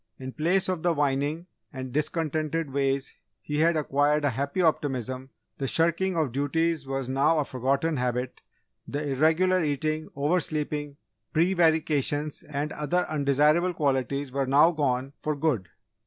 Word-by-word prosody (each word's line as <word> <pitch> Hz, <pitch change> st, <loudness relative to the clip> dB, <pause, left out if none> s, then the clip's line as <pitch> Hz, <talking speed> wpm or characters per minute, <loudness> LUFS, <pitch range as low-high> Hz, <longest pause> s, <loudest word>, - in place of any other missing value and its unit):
In 130 Hz, 0 st, -7 dB
place 175 Hz, +7 st, +1 dB
of 185 Hz, -3 st, -2 dB
the 175 Hz, -1 st, +1 dB
whining 145 Hz, +3 st, 0 dB, 0.3 s
and 130 Hz, -2 st, -7 dB
discontented 155 Hz, 0 st, -1 dB
ways 135 Hz, -1 st, -1 dB, 0.2 s
he 150 Hz, 0 st, -3 dB
had 165 Hz, +1 st, +3 dB
acquired 145 Hz, 0 st, +1 dB
a 145 Hz, -, +2 dB
happy 140 Hz, +7 st, -3 dB
optimism; 130 Hz, -6 st, 0 dB, 0.3 s
the 135 Hz, -, -1 dB
shirking 170 Hz, +5 st, +2 dB
of 155 Hz, -6 st, +1 dB
duties 145 Hz, +2 st, 0 dB
was 135 Hz, -1 st, -3 dB
now 140 Hz, +5 st, +2 dB
a 150 Hz, -, +2 dB
forgotten 140 Hz, +5 st, -1 dB
habit, 125 Hz, 0 st, -2 dB, 0.5 s
the 145 Hz, 0 st, -3 dB
irregular 165 Hz, +6 st, +3 dB
eating, 155 Hz, +1 st, -1 dB
oversleeping, 150 Hz, -1 st, -1 dB, 0.4 s
prevarications 155 Hz, -4 st, +1 dB
and 150 Hz, +1 st, -4 dB
other 155 Hz, +5 st, 0 dB
undesirable 150 Hz, +4 st, +2 dB
qualities 140 Hz, -1 st, -1 dB
were 135 Hz, 0 st, -1 dB
now 145 Hz, +5 st, +5 dB
gone 135 Hz, -4 st, -1 dB
for 155 Hz, 0 st, -1 dB
good. 140 Hz, -, -1 dB
145 Hz, 140 wpm, -27 LUFS, 135-160 Hz, 0.5 s, now